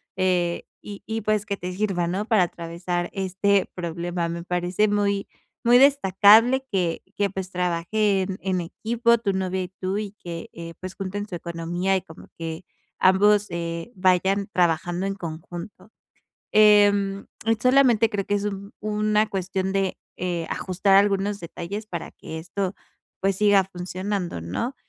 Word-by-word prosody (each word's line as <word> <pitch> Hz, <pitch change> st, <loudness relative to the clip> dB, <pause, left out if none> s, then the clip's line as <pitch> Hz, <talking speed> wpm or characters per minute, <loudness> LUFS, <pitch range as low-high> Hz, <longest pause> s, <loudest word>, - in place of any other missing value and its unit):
eh, 180 Hz, -2 st, +1 dB, 0.2 s
y 205 Hz, -1 st, -9 dB
y 225 Hz, 0 st, -3 dB
pues, 215 Hz, -1 st, 0 dB
que 200 Hz, -2 st, -3 dB
te 180 Hz, 0 st, -5 dB
sirva, 185 Hz, -3 st, 0 dB
¿no?, 190 Hz, +4 st, -2 dB
para 215 Hz, -5 st, +4 dB
atravesar 175 Hz, +1 st, -3 dB
este 195 Hz, +1 st, +1 dB
problema. 170 Hz, 0 st, -3 dB
Me 170 Hz, 0 st, -4 dB
parece 180 Hz, +4 st, 0 dB
muy 200 Hz, -1 st, 0 dB, 0.4 s
muy 240 Hz, +1 st, +7 dB
destacable, 250 Hz, -1 st, +6 dB
que 180 Hz, -5 st, 0 dB
que, 205 Hz, -1 st, +1 dB
pues, 190 Hz, -1 st, -6 dB
trabajen 185 Hz, +2 st, 0 dB
en 185 Hz, -2 st, 0 dB
equipo 235 Hz, +7 st, +1 dB
tu 215 Hz, -4 st, -1 dB
novia 190 Hz, 0 st, -1 dB
y 180 Hz, -, -7 dB
tú, 185 Hz, +1 st, -3 dB
y 210 Hz, -2 st, -4 dB
que, 170 Hz, -1 st, -6 dB
eh, 165 Hz, 0 st, -8 dB
pues, 185 Hz, 0 st, -7 dB
junten 205 Hz, +1 st, -4 dB
su 185 Hz, -, -6 dB
economía, 170 Hz, +2 st, -2 dB
y 190 Hz, -, 0 dB
como 160 Hz, -1 st, -14 dB
que 165 Hz, +1 st, -5 dB, 0.4 s
ambos, 205 Hz, +2 st, +4 dB
eh, 170 Hz, +4 st, -4 dB
vayan 190 Hz, +2 st, +2 dB
trabajando 175 Hz, +1 st, +1 dB
en 195 Hz, 0 st, -2 dB
conjunto. 175 Hz, +4 st, -8 dB, 0.6 s
Em, 205 Hz, -2 st, +4 dB, 0.3 s
solamente, 250 Hz, -4 st, +4 dB
creo 200 Hz, -3 st, -2 dB
que -, -, -1 dB
es 205 Hz, 0 st, -1 dB
un 200 Hz, -1 st, -5 dB
una 215 Hz, 0 st, +1 dB
cuestión 190 Hz, 0 st, -2 dB
de, 195 Hz, -1 st, 0 dB, 0.2 s
eh, 175 Hz, -2 st, -2 dB
ajustar 195 Hz, +1 st, +1 dB
algunos 200 Hz, 0 st, +2 dB
detalles 180 Hz, +4 st, -6 dB
para 175 Hz, -6 st, -6 dB
que 160 Hz, -, -8 dB
esto, 185 Hz, +3 st, -3 dB, 0.5 s
pues, 195 Hz, 0 st, +1 dB
siga 205 Hz, -1 st, +4 dB
funcionando, 185 Hz, -, -4 dB
¿no? 230 Hz, -, -3 dB
190 Hz, 150 wpm, -24 LUFS, 175-205 Hz, 0.6 s, muy